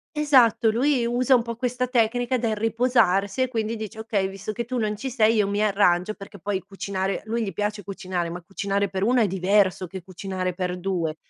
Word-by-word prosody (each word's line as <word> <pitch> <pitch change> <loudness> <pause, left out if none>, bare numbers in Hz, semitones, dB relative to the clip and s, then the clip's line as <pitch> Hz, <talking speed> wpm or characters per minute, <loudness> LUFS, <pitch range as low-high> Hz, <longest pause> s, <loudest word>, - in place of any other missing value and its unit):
Esatto, 255 -6 +4
lui 250 +1 +2
usa 250 +2 +3
un 240 - +3
po' 235 0 -5
questa 250 +1 -1
tecnica 245 +1 +1
del 225 -3 -1
riposarsi 225 -2 +2
e - - 0
quindi 225 -2 -2
dice: 220 0 -7
"Okay, 215 -3 -1
visto 195 +2 -6
che 235 +2 -4
tu 255 +1 -3
non 215 -2 -1
ci 265 +5 -4
sei 225 -3 +3
io 210 -2 +2
mi 205 +1 0
arrangio." 195 -1 +2
Perché 200 0 -11
poi 195 +1 -2
cucinare, 195 0 -3
lui 230 +2 -2
gli 195 - -5
piace 210 +3 -2
cucinare, 185 -3 -4
ma 175 +1 -6
cucinare 200 +2 -2
per 190 0 -2
1 245 +3 +3
è 215 - +3
diverso 190 0 +2
che 185 +2 -8
cucinare 185 0 -4
per 180 0 -3
2. 175 -4 -2
210 Hz, 205 wpm, -24 LUFS, 190-235 Hz, -, Esatto